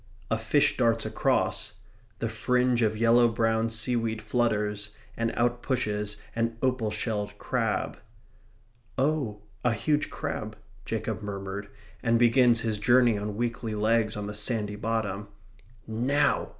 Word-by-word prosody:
A - - +3
fish - - +2
darts 115 -2 +2
across. - - 0 0.4
The - - -2
fringe 125 -1 +1
of 110 -1 +1
yellow 115 +1 +5
brown 115 0 +1
seaweed 115 0 0
flutters, 105 -2 0 0.3
and 115 0 0
out 120 0 +1
pushes 105 -5 -1 0.2
an 115 0 -1
opal 125 -4 +1
shelled 105 -2 -3
crab 115 -3 -1 1.0
"Oh, 130 -7 0 0.2
a 120 - +3
huge 150 +6 0
crab," - - -4 0.3
Jacob - - -3
murmured 100 -1 -5 0.3
and 115 -1 +3
begins 120 0 +5
his 110 -3 -1
journey 120 +1 +5
on 105 0 -3
weakly 115 -2 -2
legs 110 0 +2
on 105 - -3
the 105 - -5
sandy 105 -1 0
bottom. 105 -2 -2 0.6
Now! 135 +6 +1
115 Hz, 130 wpm, -28 LUFS, 105-120 Hz, 1.0 s, yellow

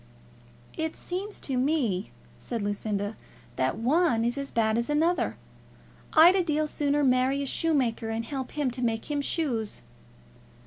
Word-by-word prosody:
"It 320 0 -2
seems 390 +4 -5
to 265 -3 -2
me," 250 - 0 0.3
said 230 -4 -4
Lucinda, 205 0 -2 0.4
"that 130 0 0
one 250 -1 +2
is 240 +1 0
as 275 0 -4
bad 220 -1 +1
as 235 - -2
another. 320 +4 +1 0.8
I'd 335 +4 +8
a 380 - +3
deal 310 -2 +1
sooner 290 -1 0
marry 260 +2 +2
a - - -3
shoemaker 265 -7 0
and 225 +1 -2
help 265 0 -5
him 290 -4 0
to 250 +1 -5
make 225 -2 -1 0.2
shoes." 245 - -2
265 Hz, 145 wpm, -27 LUFS, 225-305 Hz, 0.8 s, I'd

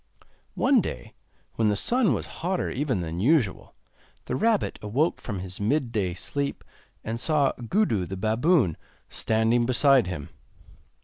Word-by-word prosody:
One - - +4
day, 60 - -6 0.4
when 110 - +2
the 105 - +1
sun 235 - +2
was - - -4 0.2
hotter 180 +2 -1
even 130 -7 -1
than 85 0 -4
usual, 125 - +1 0.5
the 125 - -2
rabbit 220 - +1
awoke 130 +11 0
from 100 -6 -5
his 95 0 -5
midday 110 - 0
sleep, 140 +9 -3 0.4
and 115 +1 -4
saw 145 0 +2 0.2
Gudu 145 - +1
the 95 - -5
baboon 110 - +2 0.3
standing 115 +2 +1
beside 130 -2 +4
him. 80 -6 -5
115 Hz, 135 wpm, -26 LUFS, 100-150 Hz, 0.5 s, One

